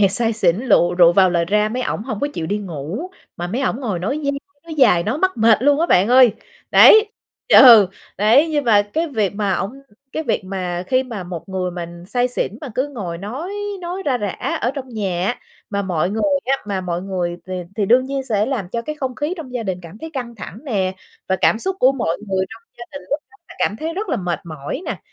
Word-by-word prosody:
nhẹt 195 -2 +4
say 230 +2 +1
xỉn, 185 -5 +2
lựu 205 -7 +2
rượu 175 -1 +6
vào 185 0 +5
lời 170 -1 +1
ra, 210 +4 +1
mấy 250 +3 -3
ổng 210 - -2
hổng 220 -4 -5
có 285 - 0
chịu 160 - -3
đi 205 +5 -1
ngủ, 185 - -6 0.3
mà 175 - -4
mấy 225 +9 -3
ổng 260 -1 -1
ngồi 210 -9 -2
nói 270 - -2
dai 280 - +1 0.3
nói 330 - -7
dài, 235 - +4
nói 220 - -2
mắc 375 +2 +1
mệt 225 0 +4
luôn 290 +2 +3
á 335 - +2
bạn 190 - +4
ơi. 250 -3 +6 0.4
Đấy 435 -1 +8 0.4
ừ, 230 - +9 0.3
đấy, 235 +10 +5
nhưng 295 -2 0
mà 210 -4 +5
cái 315 +12 -2
việc 215 -8 -1
mà 205 -2 0
ổng 195 +4 -3 0.4
cái 315 - -2
việc 245 - -1
mà 185 -2 -4
khi 255 +5 +2
mà 230 -7 -6
một 175 +1 -7
người 185 -1 -2
mình 175 0 -8
say 245 +3 0
xỉn 225 -3 -3
mà 290 - -6
cứ 265 +3 0
ngồi 190 -11 -6
nói 255 - -6 0.3
nói 360 +2 -5
ra 255 -3 +1
rả 205 -4 -3
ở 245 - +1
trong 270 -2 -6
nhà 195 -6 -2
á, 240 - -1 0.3
mà 200 -1 -1
mọi 180 -2 -1
người 220 +2 -2 0.2
á 270 +2 +2
mà 200 -2 -2
mọi 175 -1 -3
người 180 -3 -3
th - - -11 0.3
thì 205 -3 0
đương 250 +5 +4
nhiên 270 0 -3
sẽ 215 -5 0
làm 235 -10 -3
cho 230 +5 -3
cái 305 +5 -5
không 265 -3 -3
khí 300 +7 -2
trong 295 -7 -8
gia 245 -2 -3
đình 190 -4 -3
cảm 175 +5 -11
thấy 320 - -8
căng 245 -5 -5
thẳng 210 - -9
nè 195 -8 -1 0.3
và 190 - +2
cảm - - +3
xúc 380 +9 -3
của 260 +2 +5
mọi 230 -11 -1
người 190 -1 0
trong 225 +1 -12 0.2
gia 240 - -7
đình 280 - -8
lúc 290 +2 0
đó - - -21
là - - -12
cảm 210 - 0
thấy 320 +6 -4
rất 410 +3 -4
là - - 0
mệt 175 -2 -3
mỏi 155 - -6
nè, - - -3
215 Hz, 250 wpm, -20 LUFS, 185-265 Hz, 0.4 s, ừ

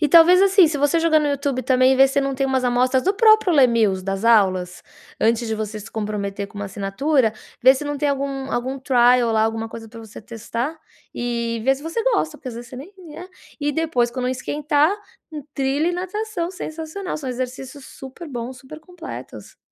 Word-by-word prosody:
E 300 - +2
talvez, 340 +4 +7
assim, 390 -2 +6
se 300 - -2
você 290 +3 +2
jogar 325 -1 +4
no 300 - 0
YouTube 280 -2 -1
também, 255 0 +3
vê 270 +1 +7
se 275 +1 +1
não 275 0 -2
tem 270 +1 0
umas 265 -1 0
amostras 250 +1 +2
do 385 +3 +1
próprio 435 -3 +5
Les 270 -4 +6
Mills, 210 -6 +1
das 195 +2 -3
aulas, 185 -6 +2 0.4
antes 230 +1 +2
de 220 - -1
você 215 0 -5
se 215 - -11
comprometer 205 -2 -4
com 205 - -12
uma 205 - -4
assinatura, 220 +6 0 0.3
vê 260 +2 +7
se 275 - -5
não 290 0 -3
tem 290 - 0
algum 275 -1 -3
algum 260 +3 -2
trial 245 -2 +3
lá, 220 -1 +2
alguma 225 0 -1
coisa 225 0 -10
pra 230 +1 -11
você 220 -2 -11
testar 230 +7 -5 0.4
e 235 -1 -2
vê 270 +1 +4
se 270 - -12
você 330 +9 -3
gosta, 395 -11 0
porque 260 - -8
às 240 - -7
vezes 235 +1 -9
você 255 - -9
nem 290 +10 -10
né, 350 0 -11 0.3
e 290 0 0
depois 290 -7 0
quando 250 0 -3
esquentar, 295 +5 0 0.4
in 300 -1 -6
trilha 275 +4 0
e - - -1
natação. 370 0 -3
Sensacional. 330 +1 -6
São 285 -4 -6
exercícios 255 +2 -6
super 270 +5 -10
bons, 250 -1 -6
super 290 +5 -12
completos, 340 +1 -10
265 Hz, 205 wpm, -21 LUFS, 235-310 Hz, 0.4 s, talvez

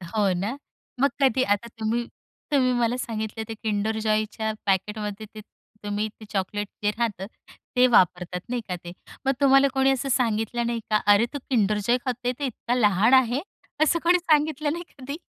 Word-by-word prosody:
हो 205 -3 +3
ना? 200 +9 -3 0.4
मग 280 +1 +3
कधी 260 -1 +3
आता 205 0 0
तुम्ही 225 +2 -1 0.5
तुम्ही 260 -3 +3
मला 240 +1 +1
सांगितले 220 -2 -4
ते - - -3
किंडर 220 0 -1
जॉयच्या 215 0 0
पॅकेटमध्ये 210 +2 -1
ते 215 - -7 0.4
तुम्ही 205 +1 -1
ते 220 - -11
चॉकलेट 205 +1 -2 0.2
जे 205 - +3
राहतं, 210 -3 -2 0.5
ते 250 0 +6
वापरतात, 180 -4 +2
नाही 245 -1 -1
का? 180 - -2
ते 175 - -7 0.3
मग 270 - +4
तुम्हाला 275 0 +6
कोणी 270 0 +3
असं 270 +1 -1
सांगितलं 235 -1 0
नाही 235 -1 -1
का? 215 - +4 0.2
"अरे 205 +3 +4
तू 285 - -3
किंडर 215 -4 +2
जॉय 245 +1 +4
खातोय? 250 -1 -1
ते 285 - -1
इतका 245 -1 -2
लहान 210 0 +3
आहे?" 245 +4 -2 0.4
असं 335 +2 +2
कोणी 350 +1 +5
सांगितलं 305 -3 +1
नाही 345 - -5 0.2
कधी? 280 +3 -6
225 Hz, 175 wpm, -25 LUFS, 210-260 Hz, 0.5 s, ते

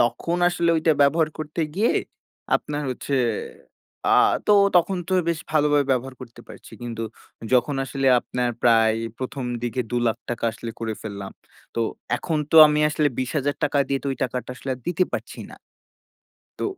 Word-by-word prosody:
তখন 165 +8 0
আসলে 170 -1 +1
ওইটা 160 0 +3
ব্যবহার 155 +3 +3
করতে 155 +2 -4 0.2
গিয়ে 220 +3 +3 0.6
আপনার 150 0 -5
হচ্ছে 135 +2 -2 0.9
আ - - +5 0.3
তো - - +7 0.2
তখন 185 +2 +2
তো - - -2 0.2
বেশ 170 - 0
ভালোভাবে 145 -2 +3
ব্যবহার 130 +1 -2
করতে 120 -2 -12
পারছি। - - -13
কিন্তু 115 -1 -5 0.5
যখন 125 +3 +3
আসলে 135 +2 -2
আপনার 125 -1 -2
প্রায় 115 -2 +4 0.2
১ম 130 0 -4 0.2
দিকে 120 +1 -2
৳২,০০,০০০ 120 0 -2
আসলে 115 - -7
করে 110 -1 -2
ফেললাম। 100 -2 -6 0.4
তো 115 - -1 0.4
এখন 160 -3 -2
তো - - +5
আমি 150 0 +1
আসলে 150 -1 +2
৳২০,০০০ 145 +2 -1
দিয়ে 135 -1 0
তো - - -5
ওই - - -6
টাকাটা 125 0 -4
আসলে 135 - -9
আর 125 - -15
দিতে 180 +1 +2
পারছি - - -6
না। - - -11 1.0
তো - - -2
135 Hz, 155 wpm, -23 LUFS, 120-155 Hz, 1.0 s, তো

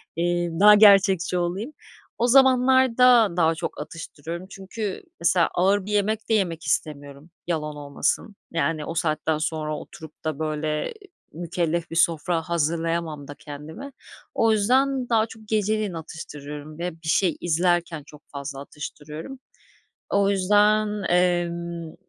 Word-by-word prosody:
eee, 175 0 0
daha 210 +1 +8
gerçekçi 195 -4 +5
olayım. 190 - -3 0.4
O 240 - +1
zamanlarda 255 -3 +5
daha 165 -1 +3
çok 160 - -5
atıştırıyorum 165 +2 -8
çünkü 195 +1 -6 0.2
mesela 170 0 +3
ağır 190 +2 +2
bir 210 - -6
yemek 210 +2 0
de - - +2
yemek 175 -6 0
istemiyorum, 145 +1 -3 0.2
yalan 150 -3 -2
olmasın. 145 +8 -2 0.2
Yani, 165 -2 -1
o 165 - -5
saatten 155 -1 0
sonra 155 -1 -2
oturup 160 0 -12
da, 155 -2 -2
böyle, 155 - -2 0.4
mükellef 170 0 -2
bir 165 - -5
sofra 165 0 +2
hazırlayamam 165 -2 -2
da 145 - -9
kendime. 155 - -9 0.4
O 225 -1 +3
yüzden 255 +4 +2
daha 220 -1 +3
çok 220 -1 -14
geceleyin 215 -2 0
atıştırıyorum 150 -1 -8
ve 180 +1 -2
bir 155 - -7
şey 175 -1 +2
izlerken 175 -1 0
çok 150 -1 -15
fazla 140 -1 -6
atıştırıyorum. 150 - -8 0.7
O 200 0 +2
yüzden, 210 +2 +2
emm, 170 -2 0
170 Hz, 130 wpm, -24 LUFS, 155-210 Hz, 0.7 s, daha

